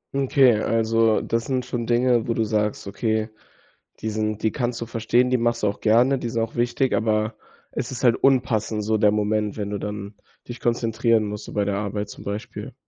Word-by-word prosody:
Okay, 135 -4 +4
also, 115 0 +2
das 115 0 -1
sind 130 -2 -1
schon 120 -2 -4
Dinge, 120 -1 +2
wo 115 - 0
du 115 - +1
sagst, 105 -1 -1
okay, 110 +2 -1 0.7
die 110 - -3
sind 110 0 -2
die 110 - +1
kannst 120 -3 -2
du 115 - -4
verstehen, 120 +2 +1
die 125 - +2
machst 120 0 0
du 105 - +2
auch 100 - -2
gerne, 120 +5 +4
die 120 - -4
sind 115 0 -1
auch 115 +1 -3
wichtig. 120 +2 +1
Aber 110 0 0 0.3
es - - -4
ist 130 - -6
halt 120 -2 +5
unpassend 115 -5 +1
so 110 +1 +1
der 105 -1 +4
Moment, 105 0 0
wenn 100 -1 -3
du 105 - -2
dann 105 0 -6 0.3
dich 120 0 -7
konzentrieren 115 -1 +1
musst, 105 0 -5
so - - -10
bei 105 -1 0
der 100 - -1
Arbeit 105 0 -3
zum - - -10
Beispiel. 100 +1 -6
110 Hz, 210 wpm, -23 LUFS, 105-120 Hz, 0.7 s, halt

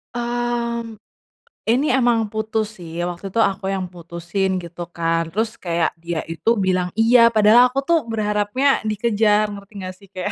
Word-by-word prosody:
Mmm, 235 -1 -2 0.7
ini 260 +5 +2
emang 235 -4 +2
putus 215 -1 -3
sih, 165 -1 -9
waktu 175 +2 -4
itu 210 +4 -2
aku 195 0 -1
yang 190 -2 -3
putusin 175 +3 -3
gitu 170 0 -8
kan, 165 -1 -1
terus 220 +4 -2
kayak 170 -2 0
dia 170 -1 -3
itu 165 +7 -1
bilang 185 -3 +1
iya 230 +1 +6
padahal 225 +2 +6
aku 260 +2 -2
tuh 335 +2 +3
berharapnya 215 +5 +1
dikejar, 215 -1 +2
ngerti 200 0 -10
nggak 185 0 -5
sih 200 - -17
kayak 190 +2 -4
210 Hz, 155 wpm, -21 LUFS, 180-230 Hz, 0.7 s, iya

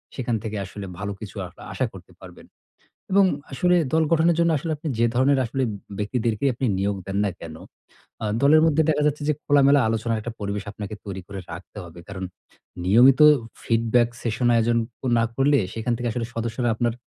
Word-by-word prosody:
সেখান 120 -3 -1
থেকে 110 -1 -4
আসলে 100 +2 -8
ভালো 100 0 -3
কিছু 105 -1 -9
আ - - -7 0.3
আশা - - 0
করতে - - -13
পারবেন। - - -13 0.7
এবং 200 +1 +6 0.3
আসলে 180 +6 +2 0.2
দল 160 0 +3
গঠনের 165 +1 +3
জন্য 170 0 +3
আসলে 160 +4 -5
আপনি 155 +2 -5
যে 115 - +4
ধরনের 135 +3 +3
আসলে 130 +3 -2 0.4
ব্যক্তিদেরকেই 115 +4 0
আপনি 130 +2 -2
নিয়োগ 100 +1 0
দেন 95 0 -4
না 100 - 0
কেনো? 80 -1 -9 0.6
আ - - -2 0.2
দলের 150 +3 +6
মধ্যে 160 0 +3
দেখা 150 -1 +2
যাচ্ছে 150 0 -1
যে - - +4
খোলামেলা 140 0 +5
আলোচনার 115 0 -1
একটা 120 +2 -6
পরিবেশ 100 0 -3
আপনাকে 105 0 -7
তৈরি 95 -2 -6
করে 100 -1 -7
রাখতে 90 +5 -10
হবে। 85 0 -13
কারণ 95 -1 -6 0.6
নিয়মিত 125 +8 +6 0.4
ফিডব্যাক 115 +1 +2
সেশন 120 +1 0
আয়োজন 115 0 +2 0.4
না 115 - +3
করলে, 140 +3 +3 0.2
সেখান 115 +2 -2
থেকে 120 +1 -3
আসলে 115 0 -3
সদস্যরা 115 +1 -2
আপনার 120 +1 0
115 Hz, 185 wpm, -23 LUFS, 105-140 Hz, 0.7 s, এবং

